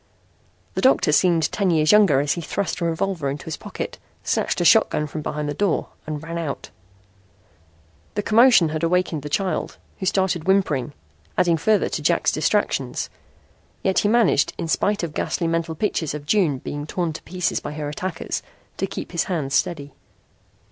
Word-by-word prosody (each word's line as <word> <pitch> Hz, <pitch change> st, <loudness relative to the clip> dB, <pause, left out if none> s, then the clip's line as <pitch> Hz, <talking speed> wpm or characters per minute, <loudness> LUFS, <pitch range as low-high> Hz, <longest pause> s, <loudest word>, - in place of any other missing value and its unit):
The -, -, -2 dB
doctor 260 Hz, -, +4 dB
seemed 165 Hz, 0 st, +3 dB
ten 200 Hz, -3 st, 0 dB
years 155 Hz, -2 st, +3 dB
younger 195 Hz, -10 st, +5 dB
as 145 Hz, 0 st, 0 dB
he 170 Hz, -, -4 dB
thrust 185 Hz, +3 st, -3 dB
a -, -, +1 dB
revolver 165 Hz, -2 st, -1 dB
into 140 Hz, +1 st, -5 dB
his 160 Hz, -, -4 dB
pocket, -, -, -7 dB, 0.2 s
snatched -, -, 0 dB
a -, -, +1 dB
shotgun 150 Hz, -, +4 dB
from 155 Hz, +1 st, -5 dB
behind 150 Hz, 0 st, -3 dB
the 145 Hz, -, -2 dB
door 190 Hz, +2 st, 0 dB, 0.2 s
and 155 Hz, 0 st, -4 dB
ran 165 Hz, +1 st, -4 dB
out. 155 Hz, -4 st, -5 dB, 1.4 s
The 205 Hz, -, -1 dB
commotion 230 Hz, -7 st, +5 dB
had 155 Hz, 0 st, -3 dB
awakened 170 Hz, -2 st, +1 dB
the 150 Hz, -, -6 dB
child, 190 Hz, +4 st, -1 dB, 0.2 s
who 190 Hz, -, -2 dB
started 185 Hz, -4 st, +1 dB
whimpering, 150 Hz, -9 st, +1 dB, 0.4 s
adding 175 Hz, -2 st, +4 dB
further 210 Hz, +6 st, +2 dB
to -, -, -3 dB
Jack's -, -, +2 dB
distractions. -, -, 0 dB, 0.7 s
Yet 190 Hz, -1 st, +2 dB
he -, -, +1 dB
managed, 220 Hz, -9 st, +3 dB
in -, -, -3 dB
spite 200 Hz, +4 st, +1 dB
of 165 Hz, -3 st, -3 dB
ghastly 170 Hz, -, -1 dB
mental 165 Hz, 0 st, -1 dB
pictures 160 Hz, -5 st, -1 dB
of 145 Hz, -1 st, -7 dB
June 170 Hz, -5 st, +2 dB
being 145 Hz, +3 st, -6 dB
torn 170 Hz, -1 st, -2 dB
to -, -, -8 dB
pieces 180 Hz, -1 st, -2 dB
by 145 Hz, -, -6 dB
her 150 Hz, -1 st, -4 dB
attackers, 175 Hz, +5 st, -4 dB, 0.4 s
to 195 Hz, -, -1 dB
keep -, -, -6 dB
his 170 Hz, -2 st, 0 dB
hands 155 Hz, -7 st, -2 dB
steady. 145 Hz, -1 st, -1 dB
165 Hz, 175 wpm, -22 LUFS, 150-190 Hz, 1.4 s, younger